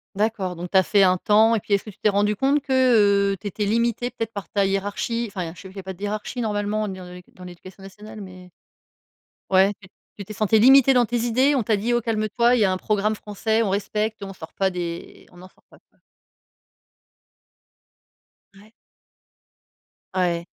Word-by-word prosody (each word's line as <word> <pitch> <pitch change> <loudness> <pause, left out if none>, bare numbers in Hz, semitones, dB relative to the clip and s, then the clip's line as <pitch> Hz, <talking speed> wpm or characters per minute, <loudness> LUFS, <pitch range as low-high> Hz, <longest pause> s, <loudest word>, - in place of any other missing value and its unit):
D'accord, 205 -3 -1
donc 175 +1 -7
tu 190 - +3
as 190 - +5
fait 200 +1 +3
un 185 0 +3
temps. 220 +4 +3
Et 220 - 0
puis, 200 - -4
est-ce 200 - +2
que 215 - -10
tu 195 - -14
t'es - - +2
rendu 205 0 +1
compte 280 +2 +2
que, 275 -1 -8 0.6
heu, 195 - -6
tu 205 - -7
étais 205 +1 -3
limité 235 +3 0
peut-être 225 -2 -5
par 200 -2 -7
ta 200 -1 0
hiérarchie? 205 +4 -2
Enfin 180 -4 -5
je 170 - -16
sais 190 - -11
qu'il 190 - -15
y 195 - -6
a - - -21
pas 190 - -6
de 185 - -19
hiérarchie 210 +4 -4
normalement 210 -1 -2
dans 185 -1 -7
le 180 0 -10
dans 180 - -14
l'éducation 185 +2 -12
nationale, 210 +2 -11
mais, 185 -1 -12 1.0
ouais 190 +2 +5
tu 185 - -16 0.3
tu 200 - -8
t'es 215 - -9
sentie 215 +1 +2
limité 270 +2 +6
dans 245 - +4
tes 240 +2 -2
idées, 255 +5 +2
on 265 - +1
t'a 215 0 +1
dit: 225 +4 -2
«Oh, 240 - +2
calme 215 -1 -1
toi, 235 +1 +4
il 245 - +1
y 205 - +5
a 190 - +1
un 185 - -1
programme 215 +2 -1
français, 220 +2 -2
on 205 - -1
respecte, 210 +1 -2
on 195 - -7
sort 160 -3 -11
pas 195 -1 0
des 170 -1 -7
on 175 - -18
n'en 185 - -12
sort - - -29
pas», - - -18
quoi? - - -36 2.5
Ouais. 205 +3 -19 1.4
Ouais. 175 -2 -1
205 Hz, 215 wpm, -23 LUFS, 190-220 Hz, 2.5 s, limité